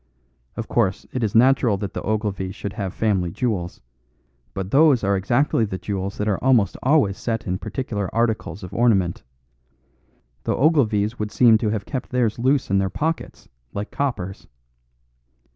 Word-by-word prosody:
Of 115 - -4
course, 100 -5 0
it 125 - -2
is 105 -1 -1
natural 125 -3 +4
that 100 -1 -5
the - - -4
Ogilvies 105 -3 -2
should 100 - -5
have 100 -3 -3
family 95 -5 0
jewels; 95 -4 -3 0.7
but 95 0 -4
those 145 -5 +5
are 100 0 +2
exactly 120 +6 +1
the 100 -3 -3
jewels 100 0 -4
that 105 - -2
are 100 -3 -1
almost 125 -6 +3
always 130 -8 +2
set 115 -2 -2
in 90 0 -2
particular 105 -3 -3
articles 110 -3 -1
of 90 +1 -8
ornament. 100 -6 +2 1.2
The - - +1
Ogilvies 115 -7 +2
would 105 0 -2
seem 115 -3 +5
to 110 - 0
have 105 -1 -2
kept 130 -3 -5
theirs 120 -4 0
loose 130 -2 +1
in 100 - +3
their 95 0 0
pockets, 160 - -3 0.3
like 100 +1 -4
coppers. 100 -9 -3
110 Hz, 160 wpm, -22 LUFS, 95-125 Hz, 1.2 s, those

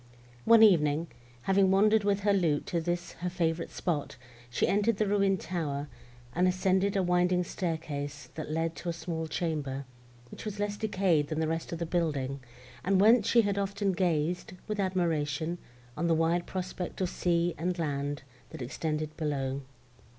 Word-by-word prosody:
One 230 -1 +8
evening, 160 -5 +4 0.3
having 195 0 +4
wandered 210 +3 +4
with 200 0 +1
her 205 0 +3
lute 165 -7 +1
to 170 - -1
this 175 +1 -2
her 180 - -1
favourite 170 -2 -1
spot, 150 -7 -3 0.3
she 120 - +1
entered 205 +2 +2
the 215 - +2
ruined 200 -2 +2
tower, 150 -5 -3 0.4
and 180 +2 +3
ascended 190 +2 +2
a 195 - +2
winding 180 0 +2
staircase, 150 -5 -4
that 155 -1 -6
led 165 +1 -1
to 175 - -4
a - - -1
small 165 -1 -4
chamber, 150 -4 -2 0.5
which - - -9
was 210 -2 -5
less 205 0 -1
decayed 190 -8 +1
than 155 0 -2
the 160 - +1
rest 165 +1 -3
of 170 - -3
the 170 - -2
building, 145 -6 -1 0.4
and 190 0 +3
whence 220 +2 +6
she 235 +1 +5
had 200 -1 0
often 200 0 0
gazed, 175 -1 0
with 210 -1 -3
admiration, 170 -3 0 0.4
on 170 +2 -1
the 165 - +3
wide 165 +2 +1
prospect 185 -1 -4
of 185 - +1
sea 170 -1 +1
and 180 +2 -1
land, 145 -3 -2 0.3
that - - -7
extended 155 +4 -3
below. 140 -3 -2
175 Hz, 170 wpm, -30 LUFS, 155-195 Hz, 0.5 s, One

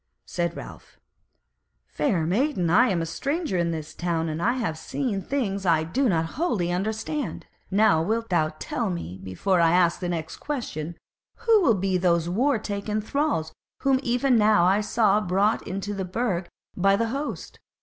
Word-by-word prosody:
Said 170 -1 -2
Ralph: - - -11 0.9
"Fair 185 - 0
maiden, 190 - +1
I 245 +7 +5
am 175 -4 0
a - - -2
stranger 280 - -2
in 170 0 +1
this 155 -2 -5
town, 165 -2 -1
and 155 +1 -3
have 235 -5 0
seen 200 - -3
things 200 -6 -2
I 165 -4 +3
do 250 +11 +1
not 165 -3 +1
wholly 205 - -1
understand; 220 - -3 0.2
now 195 -4 +4
wilt 225 +6 -1
thou 155 -4 +2
tell - - -2
me 85 +1 -5
before 170 - 0
I 165 - +5
ask 175 -1 +3
the 180 - -3
next 160 -2 -4
question, 175 - -5 0.5
who 450 -3 +5
will 240 - +4
be 190 -1 0
those 170 -2 +2
war 245 +9 +2
taken 210 0 -3
thralls 220 - -1 0.3
whom 270 -1 +3
even 245 0 +2
now 210 -4 +4
I 195 +3 +3
saw 215 -1 +2
brought 200 +3 +1
into 195 +2 -3
the 195 -1 -3
Burg 185 -2 -2 0.3
by 195 +1 +3
the 230 +2 0
host? 280 +5 -5
195 Hz, 170 wpm, -25 LUFS, 170-235 Hz, 0.9 s, I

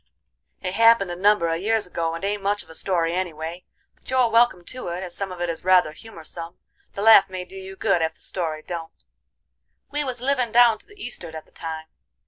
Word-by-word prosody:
"It 185 - -2
happened 230 -4 +5
a - - -4
number 200 -1 +3
a 165 0 0
years 220 +2 +1
ago 165 -2 -2
and 165 - -5
ain't 205 0 -1
much 205 +1 0
of - - -16
a - - -10
story 170 -1 0
any 180 -2 -2
way. 165 +3 -7 0.3
But - - -18
you're 255 -3 +3
welcome 230 -6 +4
to 255 +1 -6
it, 175 +2 -4
as 175 -2 -6
some 195 -1 -4
of 180 -1 -7
it 175 - 0
is 165 -1 -4
rather 180 -4 +4
humorsome, 170 -2 -9 0.4
the 200 - -4
laugh 215 -3 +8
may 185 -1 -5
do 190 - -14
you 190 0 -8
good 195 -3 +1
ef 160 0 -1
the - - -24
story 160 -4 -4
don't. 165 -2 -7 0.9
We 295 0 -1
was 255 -3 -4
livin' 255 -2 +1
down 235 -1 +6
to - - -13
the 410 0 -18
east'ard 175 - -4
at 160 - -8
the - - -27
time. 160 -1 -6
185 Hz, 230 wpm, -24 LUFS, 170-225 Hz, 0.9 s, laugh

